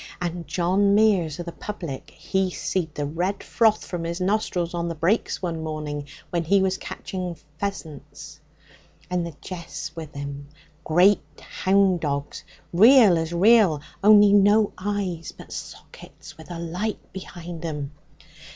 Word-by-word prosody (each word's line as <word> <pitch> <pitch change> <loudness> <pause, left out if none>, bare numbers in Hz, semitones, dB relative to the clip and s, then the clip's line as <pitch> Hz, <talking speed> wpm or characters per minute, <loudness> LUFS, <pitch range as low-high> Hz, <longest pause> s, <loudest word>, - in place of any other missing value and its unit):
And 175 -2 -4
John 185 +5 +2
Meares 190 -8 +3
o' - - -3
the 170 - -6
public, 165 -9 -7
he 190 -1 -1
seed 170 -3 -3
the 145 - -2
red 180 +7 -2
froth 220 -2 +2
from 175 -2 -4
his 170 +2 -3
nostrils 185 -3 0
on 170 0 -2
the 170 - -3
brakes 185 +6 0
one 165 -2 -2
morning 150 -2 -4 0.2
when 170 -1 0
he 195 +5 +3
was 190 0 0
ketching 180 -3 -5 0.2
pheasants. 170 -7 -6 0.7
And 180 -1 0
the 165 - -9
jeath's 175 -2 -7
with 160 -3 -8
him, 140 0 -6 0.4
great 180 +5 +4 0.2
hound 190 -1 +2
dogs, 140 -2 -3 0.3
real 220 0 +7
as 165 0 -2
real, 190 -3 +5 0.2
only 205 -1 +7
no 205 +1 +4
eyes, 185 -4 -3
but - - -12
sockets - - -10
with 160 +1 -14
a 175 - -5
light 180 +6 -4
behind 175 -3 -8
'em. 150 -4 -4
175 Hz, 145 wpm, -24 LUFS, 160-200 Hz, 0.7 s, real